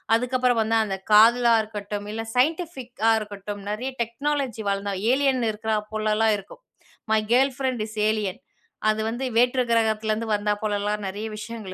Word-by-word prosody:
அதுக்கப்புறம் 250 0 +1
வந்து 225 +1 +1
அந்த 195 -2 -3
காதலா 235 +2 +6
இருக்கட்டும், 205 -1 -6
இல்ல 225 0 -4
சைன்டிஃபிக்கா 260 - 0
இருக்கட்டும் 205 -1 -7
நெறைய 250 +5 -3
டெக்னாலஜி 255 -1 -3
வளந்த 200 0 -2 0.2
ஏலியன் 265 -4 +2
இருக்கறா 215 0 -2 0.2
போலலாம் 215 0 +2
இருக்கும். 200 - -14 0.5
"My 215 - +3
girlfriend 260 -2 +1
is 215 - -11 0.2
alien". 210 -4 -2 0.5
அது 215 0 +1
வந்து 240 +4 -3
வேற்று 250 +2 +3
கிரகத்தலிருந்து 220 -1 +1
வந்தா 210 0 0
போலலாம் 210 0 -1
நெறைய 205 +3 -4
விஷயங்கள் 215 -3 -7
220 Hz, 140 wpm, -24 LUFS, 210-245 Hz, 0.5 s, காதலா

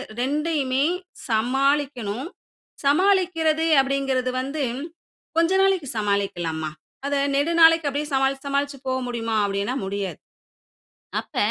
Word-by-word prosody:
2யுமே 275 0 0 0.5
சமாளிக்கணும். 260 +1 0 0.6
சமாளிக்கிறது 330 -1 +3 0.2
அப்படிங்கிறது 270 -2 0
வந்து, 275 +3 -3 0.7
கொஞ்ச 335 +2 +3
நாளைக்கு 380 -8 +1
சமாளிக்கலாம்மா. 175 -7 -1 0.4
அத 285 - 0 0.2
நெடு 290 +4 +1
நாளைக்கு 325 -2 +6
அப்படியே 290 +2 -2
சமாளிச்சு, 270 +1 +1
சமாளிச்சு 280 0 -1
போ 260 - -1 0.2
முடியுமா 230 -2 -2
அப்படின்னா, 200 +5 -1
முடியாது. 195 -4 -3 1.0
அப்ப - - -16
275 Hz, 100 wpm, -23 LUFS, 230-300 Hz, 1.0 s, நாளைக்கு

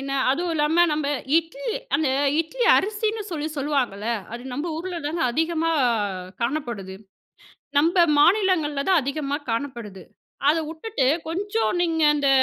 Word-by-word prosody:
என்ன 275 0 -4 0.2
அதுவும் 335 +4 -1
இல்லாம 315 +3 +3
நம்ம 300 -1 -1 0.3
இட்லி, 455 +9 -5 0.2
அந்த 295 -1 +2 0.3
இட்லி 475 +9 -2
அரிசின்னு 430 +2 -1
சொல்லி 310 -1 -3
சொல்லுவாங்கல்ல. 255 -7 -1 0.2
அது 240 +1 -6
நம்ப 295 +6 -3
ஊர்ல 350 +1 -4
தாங்க 325 +1 -2
அதிகமா 325 +3 0 0.7
காணப்படுது. 235 -8 -3 0.8
நம்ப 330 +5 +2 0.2
மாநிலங்கள்ல 335 -5 +3
தான் 370 -4 +5
அதிகமா 280 +1 -2
காணப்படுது. 230 -6 -4 0.5
அத 310 - +4
வுட்டுட்டு 320 -3 -2 0.2
கொஞ்சம் 405 +5 -1
நீங்க 325 -2 0
அந்த 285 -1 +1
315 Hz, 125 wpm, -23 LUFS, 275-345 Hz, 0.8 s, தான்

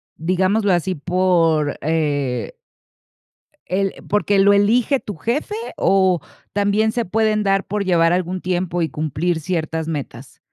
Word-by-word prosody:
digámoslo 185 +5 +1
así, 180 +2 0
por, 165 -3 +1
eh 145 -6 -1 1.2
él, 195 +2 0 0.2
porque 205 -1 +2
lo 200 +1 +5
elige 230 +7 +3
tu 205 - -7
jefe, 255 - -2 0.2
o 190 -2 +3 0.3
también 205 +2 +1
se 235 0 -2
pueden 215 +2 +1
dar 195 -1 +1
por 205 0 -2
llevar 165 -2 +3
algún 180 0 -2
tiempo 175 -1 -1
y 160 - 0
cumplir 160 +3 -2
ciertas 160 -1 -3
metas? 135 -4 -6
185 Hz, 130 wpm, -20 LUFS, 160-205 Hz, 1.2 s, lo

